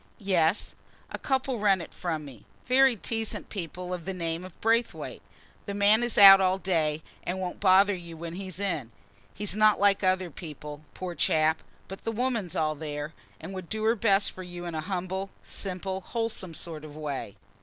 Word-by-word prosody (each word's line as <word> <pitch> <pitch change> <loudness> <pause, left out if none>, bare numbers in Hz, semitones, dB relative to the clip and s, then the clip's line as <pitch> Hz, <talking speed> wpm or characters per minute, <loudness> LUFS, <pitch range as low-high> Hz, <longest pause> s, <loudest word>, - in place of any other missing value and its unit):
"Yes; 185 -3 +1 0.4
a - - -5
couple 265 -3 0
rent 200 -2 +4
it - - -12
from 160 -4 -3
me, 130 -7 -12 0.2
very 260 0 +5
decent 225 +1 -3
people 180 -1 -5
of 175 -2 -5
the 190 0 -3
name 165 -1 -2
of 185 -2 -12
Braithwaite. 230 +1 0 0.5
The 200 - -3
man 205 +2 +5
is 240 -2 0
out 195 -1 +11
all 185 0 +3
day, 160 -5 0 0.2
and 185 +2 -3
won't 180 -1 -4
bother 195 +1 +5
you 170 -3 -8
when 165 +1 -6
he's 185 0 -7
in; 155 - -2 0.4
he's 205 -1 -1
not 215 0 +5
like 200 0 +3
other 185 -2 +1
people, 150 -2 -8
poor 185 -1 -5
chap. 155 0 +2 0.3
But 195 - -9
the 225 - -1
woman 230 -4 -1
's - - -8
all 155 -1 +1
there, 150 0 -5 0.3
and 195 - -8
would 185 -3 -7
do 220 0 -3
her 225 +1 +4
best 200 -3 +3
for 185 - -9
you 175 -1 -7
in 170 - -4
a 155 - -2
humble, 190 +2 -3
simple, 190 0 -3
wholesome 220 -6 -3
sort 160 -2 -6
of 150 -1 -10
way." 145 -9 -4
185 Hz, 190 wpm, -28 LUFS, 165-205 Hz, 0.5 s, out